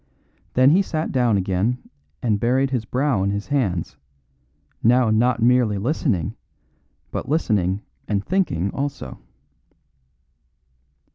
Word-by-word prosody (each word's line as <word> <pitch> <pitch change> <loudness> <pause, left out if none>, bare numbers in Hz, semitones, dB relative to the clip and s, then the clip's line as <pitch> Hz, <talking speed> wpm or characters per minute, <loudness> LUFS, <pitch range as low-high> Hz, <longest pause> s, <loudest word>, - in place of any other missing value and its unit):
Then 130 +2 +6
he 185 +5 +5
sat 160 -5 -2
down 120 -5 +2
again 95 +6 0 0.5
and 110 -4 +1
buried 130 +4 +1
his 120 -4 -1
brow 130 -3 0
in 100 - +1
his 100 +1 -2
hands, 105 - -1 0.8
now 120 0 +4
not 115 +1 +2
merely 120 -4 +3
listening, 110 - -1 0.8
but - - -4
listening 105 - +1 0.2
and 100 -1 -1
thinking 155 - 0
also. 140 -1 -5
120 Hz, 115 wpm, -22 LUFS, 100-135 Hz, 0.8 s, Then